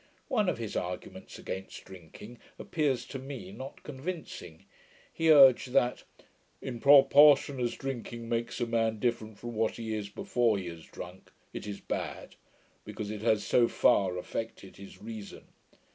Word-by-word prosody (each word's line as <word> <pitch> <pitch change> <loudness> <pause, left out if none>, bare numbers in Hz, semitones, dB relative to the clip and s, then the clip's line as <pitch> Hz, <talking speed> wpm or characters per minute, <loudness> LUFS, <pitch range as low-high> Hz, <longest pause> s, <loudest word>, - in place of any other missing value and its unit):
One 215 -8 +2
of - - -2
his 115 -3 -5
arguments 90 0 -5
against 95 +1 -7
drinking, 95 +6 -12 0.2
appears 140 -6 -1
to 135 - -7
me 140 +8 -8
not 135 -7 -9
convincing. 150 - -7 0.5
He 165 -1 +3
urged, 135 -3 +7
that, 125 -1 +2 0.5
'in 120 -3 -6
proportion 140 0 +6
as 120 -1 -1
drinking 120 -3 -6
makes 115 +1 -2
a 120 - +1
man 115 -1 0
different 110 -2 -2
from 120 0 -7
what 110 0 0
he 115 -1 -4
is 105 -2 -4
before 120 - +1
he 95 - -5
has 80 -1 -10
drunk, 90 +2 -10 0.2
it - - -6
is 100 -1 -5
bad; - - -5 0.5
because 105 -1 -6
it 105 -1 -6
has 110 -2 +2
so 120 -1 +4
far 95 -5 +2
affected 105 +1 -6
his 100 0 -12
reason'. 110 -2 -9
115 Hz, 155 wpm, -30 LUFS, 105-135 Hz, 0.5 s, urged